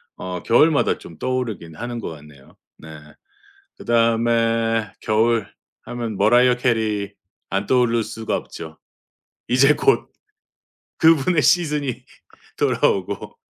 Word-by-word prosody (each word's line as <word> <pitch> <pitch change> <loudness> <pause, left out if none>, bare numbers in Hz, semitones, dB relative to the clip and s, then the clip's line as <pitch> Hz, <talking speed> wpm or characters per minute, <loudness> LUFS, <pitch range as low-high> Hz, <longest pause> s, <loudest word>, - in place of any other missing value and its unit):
어 90 -1 -6
겨울마다 150 +5 +3
좀 80 - -13
떠오르긴 115 -9 -4
하는 120 +3 -5
것 - - -5
같네요. 75 -3 -14 0.2
네. 80 - -14 0.9
그 - - -12
다음에 115 -1 +1
겨울 110 0 +1 0.4
하면 115 -3 -5
머라이어 120 +5 +4
캐리 110 -5 -1 0.4
안 100 +1 -1
떠오를 120 -2 +2
수가 110 +1 -4
없죠. 80 -1 -10 0.7
이제 135 +4 +4
곧 415 - +1 0.9
그분의 160 +1 +4
시즌이 150 -3 +1 0.5
돌아오고 - - -1
115 Hz, 230 characters per minute, -21 LUFS, 105-125 Hz, 0.9 s, 머라이어